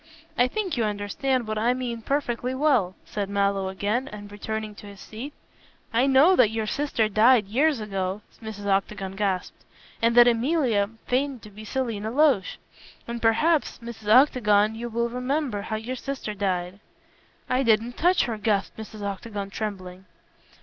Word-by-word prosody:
"I 245 Hz, -, +4 dB
think 375 Hz, -1 st, -3 dB
you 235 Hz, -, +1 dB
understand 215 Hz, +4 st, -1 dB
what 215 Hz, 0 st, -2 dB
I 240 Hz, +3 st, +2 dB
mean 240 Hz, -3 st, -4 dB
perfectly 255 Hz, -1 st, -1 dB
well," 260 Hz, -11 st, +2 dB
said 200 Hz, -2 st, -4 dB
Mallow 200 Hz, -1 st, 0 dB
again, 210 Hz, +7 st, -1 dB
and 205 Hz, -3 st, -9 dB
returning 215 Hz, +1 st, -5 dB
to 205 Hz, -, -12 dB
his 200 Hz, -1 st, -12 dB
seat. 240 Hz, +7 st, -8 dB, 0.6 s
"I 245 Hz, +4 st, +3 dB
know 280 Hz, +8 st, +6 dB
that 220 Hz, -, +5 dB
your 220 Hz, 0 st, -2 dB
sister 235 Hz, -2 st, 0 dB
died 220 Hz, +2 st, +5 dB
years 270 Hz, +7 st, +2 dB
ago," 195 Hz, -1 st, -3 dB, 0.2 s
Mrs. 215 Hz, -2 st, -7 dB
Octagon 195 Hz, -1 st, -1 dB
gasped, 190 Hz, -2 st, -2 dB, 0.4 s
"and 230 Hz, +1 st, +3 dB
that 240 Hz, 0 st, +9 dB
Emilia 240 Hz, -4 st, +2 dB, 0.2 s
feigned 260 Hz, -1 st, -1 dB
to 210 Hz, -, -12 dB
be 210 Hz, +2 st, -11 dB
Selina 220 Hz, -3 st, -3 dB
Loach. 265 Hz, -6 st, +2 dB, 0.5 s
And 235 Hz, 0 st, -5 dB
perhaps, 300 Hz, +8 st, +2 dB
Mrs. 230 Hz, -2 st, -10 dB
Octagon, 220 Hz, -5 st, +5 dB
you 235 Hz, +2 st, -5 dB
will 235 Hz, +1 st, 0 dB
remember 250 Hz, -2 st, -2 dB
how 220 Hz, +2 st, -4 dB
your 225 Hz, +4 st, -4 dB
sister 260 Hz, -4 st, -5 dB
died." 185 Hz, -2 st, -2 dB, 0.7 s
"I 255 Hz, +1 st, +1 dB
didn't 230 Hz, -1 st, +2 dB
touch 355 Hz, +2 st, +3 dB
her," 225 Hz, -3 st, -3 dB
gasped 210 Hz, -2 st, 0 dB
Mrs. 215 Hz, -1 st, -8 dB
Octagon, 200 Hz, 0 st, -5 dB
trembling. 190 Hz, -3 st, -6 dB
220 Hz, 160 wpm, -25 LUFS, 205-255 Hz, 0.7 s, that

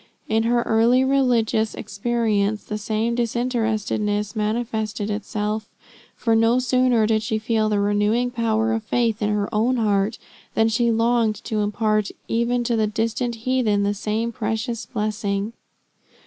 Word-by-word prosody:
In 220 Hz, +1 st, +2 dB
her 240 Hz, 0 st, +2 dB
early 235 Hz, +3 st, +3 dB
religious 245 Hz, -5 st, +2 dB
experience, 215 Hz, -1 st, -1 dB
the 210 Hz, -, -5 dB
same 220 Hz, +2 st, -1 dB
disinterestedness 220 Hz, -3 st, -1 dB
manifested 215 Hz, -1 st, -2 dB
itself; 210 Hz, +1 st, -3 dB, 0.5 s
for 230 Hz, -2 st, +1 dB
no 225 Hz, +2 st, +4 dB
sooner 255 Hz, -2 st, +3 dB
did 215 Hz, 0 st, +2 dB
she 215 Hz, +1 st, -1 dB
feel 220 Hz, 0 st, 0 dB
the 210 Hz, -1 st, +1 dB
renewing 210 Hz, +4 st, +1 dB
power 225 Hz, -2 st, 0 dB
of 225 Hz, -, -1 dB
faith 230 Hz, 0 st, 0 dB
in 210 Hz, -, +1 dB
her 210 Hz, -1 st, 0 dB
own 230 Hz, +4 st, +2 dB
heart, 210 Hz, -1 st, +1 dB, 0.4 s
than 225 Hz, 0 st, +3 dB
she 235 Hz, +1 st, +2 dB
longed 230 Hz, -1 st, +2 dB
to 215 Hz, -, -2 dB
impart 210 Hz, 0 st, 0 dB, 0.2 s
even 235 Hz, +1 st, 0 dB
to 235 Hz, 0 st, 0 dB
the 220 Hz, -1 st, +2 dB
distant 225 Hz, +3 st, -1 dB
heathen 235 Hz, -6 st, +2 dB
the 200 Hz, 0 st, +1 dB
same 215 Hz, +3 st, -2 dB
precious 225 Hz, +1 st, -3 dB
blessing. 210 Hz, -1 st, -2 dB
220 Hz, 145 wpm, -22 LUFS, 210-235 Hz, 0.5 s, no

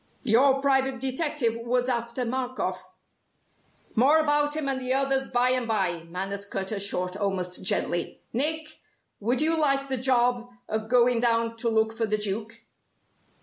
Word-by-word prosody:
Your 265 Hz, +3 st, +4 dB
private 270 Hz, -2 st, +1 dB
detective 265 Hz, -2 st, 0 dB
was 245 Hz, +1 st, 0 dB
after 235 Hz, 0 st, -2 dB
Markoff 255 Hz, +1 st, -3 dB, 0.5 s
" -, -, -35 dB
"More 270 Hz, +7 st, +5 dB
about 295 Hz, -1 st, +2 dB
him 310 Hz, -3 st, -2 dB
and 265 Hz, -1 st, -2 dB
the 255 Hz, +1 st, 0 dB
others 270 Hz, 0 st, +1 dB
by 245 Hz, 0 st, +2 dB
and 255 Hz, -2 st, 0 dB
by," 180 Hz, -7 st, -1 dB
Manners 195 Hz, +3 st, -4 dB
cut 190 Hz, 0 st, -4 dB
her 210 Hz, -, -2 dB
short 185 Hz, -2 st, -1 dB
almost 190 Hz, -3 st, -2 dB
gently, 175 Hz, -2 st, -1 dB
"Nick, 305 Hz, +5 st, 0 dB, 0.4 s
would 240 Hz, +6 st, 0 dB
you 320 Hz, +2 st, +4 dB
like 275 Hz, -3 st, +1 dB
the 265 Hz, -, 0 dB
job 245 Hz, -1 st, +1 dB, 0.2 s
of 220 Hz, 0 st, -3 dB
going 245 Hz, -1 st, +4 dB
down 230 Hz, -1 st, +1 dB
to 230 Hz, 0 st, -1 dB
look 220 Hz, 0 st, +1 dB
for 225 Hz, 0 st, -2 dB
the 215 Hz, 0 st, 0 dB
Duke?" 215 Hz, +3 st, -4 dB
245 Hz, 160 wpm, -26 LUFS, 220-270 Hz, 0.5 s, More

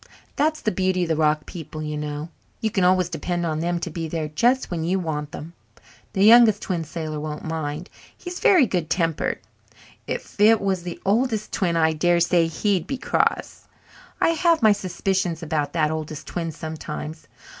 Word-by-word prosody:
That 310 Hz, +2 st, +1 dB
is -, -, -15 dB
the 215 Hz, -, +1 dB
beauty 185 Hz, 0 st, +1 dB
of 170 Hz, -, -3 dB
the 160 Hz, -, +2 dB
rock 150 Hz, -1 st, +1 dB
people, 160 Hz, -2 st, -8 dB
you 150 Hz, 0 st, -3 dB
know. 150 Hz, +1 st, -4 dB, 0.3 s
You 220 Hz, -2 st, -1 dB
can 195 Hz, -4 st, +1 dB
always 185 Hz, -1 st, +4 dB
depend 175 Hz, +1 st, -3 dB
on 155 Hz, -2 st, -1 dB
them 170 Hz, +1 st, -1 dB
to 170 Hz, -, -4 dB
be 165 Hz, +1 st, -4 dB
there 155 Hz, -1 st, -3 dB
just 240 Hz, -, +1 dB
when 165 Hz, -2 st, -2 dB
you 180 Hz, +4 st, +1 dB
want 150 Hz, -4 st, -3 dB
them. 160 Hz, +3 st, -8 dB, 0.6 s
The 195 Hz, +1 st, +3 dB
Youngest 225 Hz, -2 st, +7 dB
Twin 175 Hz, -4 st, -2 dB
Sailor 155 Hz, -1 st, -5 dB
won't 150 Hz, 0 st, -5 dB
mind 160 Hz, 0 st, -4 dB, 0.3 s
he's 355 Hz, 0 st, -7 dB
very 360 Hz, -9 st, +6 dB
good 175 Hz, -7 st, -2 dB
tempered. 165 Hz, -3 st, 0 dB, 0.7 s
If -, -, -6 dB
it 220 Hz, +1 st, +6 dB
was 190 Hz, -2 st, -1 dB
the 175 Hz, -1 st, -7 dB
Oldest 220 Hz, +1 st, +1 dB
Twin 170 Hz, -3 st, 0 dB
I 160 Hz, -1 st, +3 dB
dare 175 Hz, +2 st, +2 dB
say 170 Hz, -1 st, +3 dB
he'd 185 Hz, +2 st, 0 dB
be 270 Hz, -, -3 dB
cross. -, -, -1 dB, 0.5 s
I -, -, +3 dB
have 330 Hz, -3 st, +2 dB
my 215 Hz, -, +7 dB
suspicions 185 Hz, -3 st, -1 dB
about 150 Hz, -2 st, -1 dB
that 155 Hz, -2 st, +1 dB
Oldest 155 Hz, -1 st, -5 dB
Twin 165 Hz, -2 st, -3 dB
sometimes. 155 Hz, 0 st, -7 dB
170 Hz, 185 wpm, -23 LUFS, 155-195 Hz, 0.7 s, Youngest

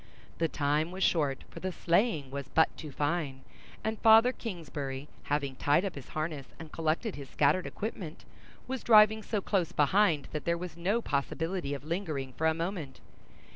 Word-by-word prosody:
The 165 Hz, -, +3 dB
time 150 Hz, +1 st, 0 dB
was 190 Hz, +1 st, -3 dB
short, 145 Hz, -5 st, +1 dB
for -, -, -8 dB
the 185 Hz, -, -3 dB
sleighing 170 Hz, -, +1 dB
was 140 Hz, -1 st, -5 dB
but 160 Hz, -, +3 dB
too 155 Hz, -3 st, -8 dB
fine; 145 Hz, -2 st, -1 dB, 0.4 s
and 220 Hz, 0 st, -2 dB
Father 225 Hz, +2 st, +7 dB
Kingsbury, 150 Hz, -, -5 dB, 0.2 s
having 140 Hz, -2 st, -1 dB
tied 150 Hz, +8 st, +3 dB
up 190 Hz, -, -3 dB
his 140 Hz, -, -10 dB
harness, 155 Hz, -4 st, -3 dB
and 160 Hz, -1 st, -10 dB
collected 165 Hz, +6 st, -1 dB
his 140 Hz, -2 st, -9 dB
scattered 185 Hz, -1 st, +2 dB
equipment, 190 Hz, -7 st, -6 dB, 0.4 s
was 260 Hz, -2 st, -3 dB
driving 220 Hz, -1 st, +6 dB
so 210 Hz, -1 st, -2 dB
close 185 Hz, -4 st, 0 dB
behind 165 Hz, -1 st, +3 dB
that 150 Hz, -, -4 dB
there 170 Hz, 0 st, +1 dB
was 175 Hz, -1 st, -6 dB
no 200 Hz, +7 st, 0 dB
possibility 150 Hz, +2 st, -2 dB
of 140 Hz, -, -8 dB
lingering 155 Hz, -6 st, -3 dB
for 160 Hz, +6 st, 0 dB
a 160 Hz, -, +3 dB
moment. 165 Hz, -5 st, -4 dB
165 Hz, 175 wpm, -30 LUFS, 145-190 Hz, 0.4 s, Father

